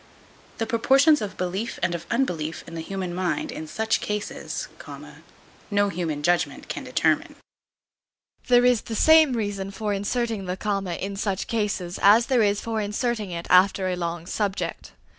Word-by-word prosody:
The 225 - -1
proportions 270 +6 +4
of 205 -2 -5
belief 190 +6 -3
and 185 - +1
of 170 0 -5
unbelief 170 - -1
in 165 - -11
the 165 - -4
human 185 0 -4
mind 185 - -1
in 155 - -7
such 220 +7 0
cases, 210 0 -4 1.0
no 205 -1 +2
human 160 -5 -3
judgment 175 +2 0
can - - -5
determine. - - 0 1.1
There 245 0 +5
is 250 -3 +4
the 225 - -6
same 315 +1 +6
reason 205 -4 -2
for 205 +1 -3
inserting 215 +1 -2
the 180 +1 -3
comma 195 -3 -2
in 195 +2 -5
such 195 -2 -1
cases 200 -5 -2
as 215 +4 +6
there 250 -2 +2
is 205 -1 +2
for 225 -1 -2
inserting 210 0 -2
it 170 -1 -5
after 185 +1 +4
a 180 - -1
long 170 -1 -4
subject. 200 +1 -3
200 Hz, 160 wpm, -25 LUFS, 180-225 Hz, 1.1 s, same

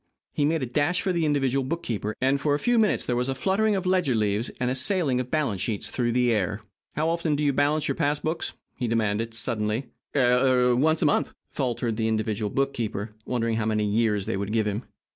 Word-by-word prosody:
He 145 - +1
made 155 -1 +1
a - - +1
dash 150 +9 +1
for 190 -2 0
the 170 -2 +1
individual 135 -2 +1
bookkeeper, 120 -8 -3
and, 135 +2 +1
for 145 -1 +2
a - - -2
few 240 +7 +2
minutes 215 -2 +2
there 125 - 0
was 125 +2 0
a 135 - -1
fluttering 200 +8 +1
of 190 -1 -2
ledger 180 -9 +2
leaves 105 +1 0
and 125 0 0
a - - -1
sailing 135 -1 +1
of 125 0 -3
balance 135 -12 0
sheets 105 -4 -2
through 120 -2 0
the 125 0 +3
air. 105 0 -1 0.4
"How 155 +2 0
often 165 -2 0
do 150 - -1
you 145 -1 +2
balance 145 +2 +1
your 140 - +1
pass 145 +2 0
books?" 160 +2 -3 0.2
he 125 - -2
demanded, 115 0 0
suddenly. 115 +2 0 0.2
"Er 125 -1 +4
once 155 +5 +2
a - - +3
month," 145 - +1 0.2
faltered 120 -4 -2
the 110 -1 0
individual 110 -1 -1
bookkeeper, 115 -5 -2
wondering 115 -2 0
how 110 -1 -1
many 105 -1 +1
years 105 -1 +1
they - - -2
would 100 +1 -3
give 110 -1 +1
him. 105 +3 -2
125 Hz, 220 wpm, -26 LUFS, 110-145 Hz, 0.4 s, Er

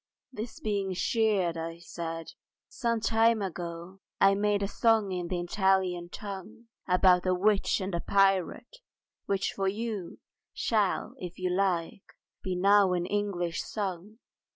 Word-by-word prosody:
This 225 0 -6
being 200 -3 -1
cheered, 195 -5 +1
I 165 +1 -5
said, 165 -1 -6 0.4
"Some 230 -3 -1
time 225 +1 +3
ago 175 +1 -6 0.2
I 195 0 +6
made 205 0 +1
a - - 0
song 220 -1 +2
in 180 -1 -3
the 180 0 -2
Italian 180 -1 +1
tongue 210 +4 -8 0.2
About 180 0 +4
a 185 - +3
witch 200 +2 +2
and 190 -1 -4
pirate—which 195 - -1
for 195 -1 -1
you 210 -3 -3 0.4
Shall, 210 -4 0
if 180 -1 -7
you 185 -1 -1
like, 180 -1 0 0.4
be 185 -1 -3
now 200 +1 +4
in 175 -1 0
English 185 -4 -1
sung." 200 0 -5
195 Hz, 130 wpm, -29 LUFS, 180-210 Hz, 0.4 s, I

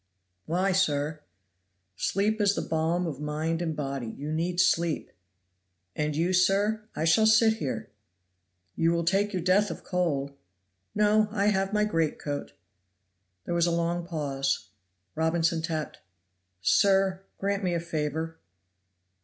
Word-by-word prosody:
"Why, 185 +4 +1
sir?" 155 -5 +1 0.8
"Sleep 210 - 0
is 200 -1 +3
the - - -2
balm 165 +2 0
of 150 -5 -4
mind 155 +3 -2
and 160 -3 -2
body 135 -4 -3
you 145 +7 -6
need 175 +2 -1
sleep." 170 -3 +1 0.8
"And 150 -1 -1
you, 170 +4 +1
sir?" 205 +4 +2
"I 155 - -1
shall 215 +7 +5
sit 220 0 +5
here." 140 -8 -4 0.8
"You 165 +1 +2
will 170 0 0
take 195 +4 +1
your 185 -4 -2
death 195 +3 +3
of - - -7
cold." 155 -7 -1 0.6
"No, 210 +1 +4
I 205 -1 +1
have 195 0 0
my 210 0 +2
greatcoat." 155 - -2 0.9
There - - -2
was 170 0 +2
a - - +1
long 170 +1 0
pause. 140 - -2 0.4
Robinson 165 0 +1
tapped. 160 -2 -4 0.6
"Sir, 195 - +3 0.2
grant 200 +1 -1
me 180 -2 0
a - - 0
favor." 160 0 -3
170 Hz, 135 wpm, -27 LUFS, 155-195 Hz, 0.9 s, shall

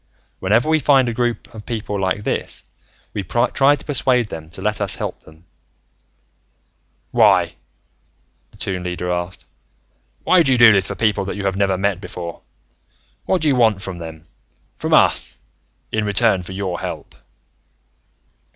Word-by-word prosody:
"Whenever 110 +8 +2
we 160 0 +3
find 135 -2 +4
a 120 - -1
group 120 0 -2
of 110 -2 -9
people 105 -3 -4
like 95 +2 -1
this, - - -3 0.5
we 100 - -2
try 125 - +2
to - - -9
persuade 125 -5 +1
them 80 -1 -8
to 80 - -12
let 105 +2 -1
us 100 - 0
help - - -5
them." 80 +2 -19 1.7
"Why?" - - +4 1.0
the - - -20
Toon 95 -2 -3
Leader 90 0 -3
asked. 90 +1 -4 0.8
"Why 185 -1 +5
do 135 -5 +3
you - - +2
do 120 -2 +8
this 95 -1 +2
for - - -4
people 110 -3 +1
that 100 - -4
you 100 -1 -4
have 95 -1 0
never 95 -1 +1
met 100 -1 -1
before? 85 -4 -7 0.8
What 185 -3 0
do - - +2
you 140 - +3
want 110 -5 +3
from 95 -2 -6
them 80 -1 -9 0.5
from - - -4
us - - +3 0.5
in 110 - 0
return 105 -1 +2
for 90 +2 -9
your 95 -2 -3
help?" - - -6
100 Hz, 160 wpm, -20 LUFS, 95-120 Hz, 1.7 s, do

